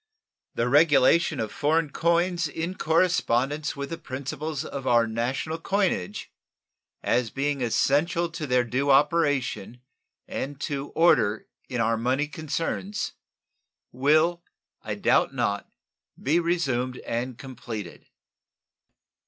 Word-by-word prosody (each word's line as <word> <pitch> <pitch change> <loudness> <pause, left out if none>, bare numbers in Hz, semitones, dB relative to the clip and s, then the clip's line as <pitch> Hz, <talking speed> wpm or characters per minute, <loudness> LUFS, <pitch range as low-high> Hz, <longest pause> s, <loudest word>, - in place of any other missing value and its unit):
The 120 - 0
regulation 145 +2 +4
of 110 -2 -2
foreign 155 0 +1
coins 170 +1 +1
in 165 +4 -4
correspondency 155 -5 +1
with 140 +1 -5
the 165 - -4
principles 145 +3 -5
of 135 -2 -6
our 120 -1 +4
national 125 +8 -2
coinage, 175 - -1 0.7
as 120 -1 +1
being 140 +1 -2
essential 150 +8 +2
to 165 -2 -5
their 125 -1 +3
due 130 +4 -1
operation 140 -5 +2 0.5
and 140 +1 -5
to 140 -1 -3
order 110 -10 +3 0.2
in 125 - -3
our 115 0 +2
money 130 +6 0
concerns, 165 +6 -3 0.8
will, 155 +6 +2 0.4
I - - -4
doubt - - +2
not, 100 0 -1 0.5
be 155 +6 +2
resumed 135 -8 0
and 120 +1 -3
completed. 120 -8 -8
140 Hz, 110 wpm, -26 LUFS, 125-165 Hz, 0.8 s, regulation